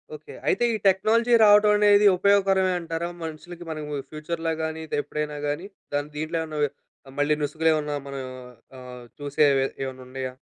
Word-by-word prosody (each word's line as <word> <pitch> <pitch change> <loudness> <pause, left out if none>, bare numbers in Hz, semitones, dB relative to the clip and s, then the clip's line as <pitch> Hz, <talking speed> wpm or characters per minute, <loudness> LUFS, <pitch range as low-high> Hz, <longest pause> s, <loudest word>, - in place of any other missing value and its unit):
Okay. 150 0 -12
అయితే, 195 - +2
ఈ - - 0
technology 225 +5 +3
రావటమనేది 210 0 +6
ఉపయోగకరమే 195 -1 +3
అంటారా? 165 0 -4
మనుషులకి 170 +2 -8
మనము 150 -2 -4
ఫ్యూచర్‌లో 165 +1 -3
గాని, 160 0 -4
ఇదెప్పుడైనా 150 0 -3
గాని. 150 +6 -3 0.3
దాన్ 145 +1 -1
దీంట్లో 155 +2 -2
ఏమన్న 155 -1 -5
ఓహ్, 145 - +2 0.4
ఆహ్, 135 - -13
మళ్ళీ 145 +1 +2
నుసుగులేమన్నా 150 0 0
మనం 140 -1 -5 0.6
ఆహ్, 125 -1 -10 0.2
చూసేవే 140 -1 +2 0.2
ఏమన్నుండయా? 130 0 -6
155 Hz, 140 wpm, -25 LUFS, 145-185 Hz, 0.6 s, రావటమనేది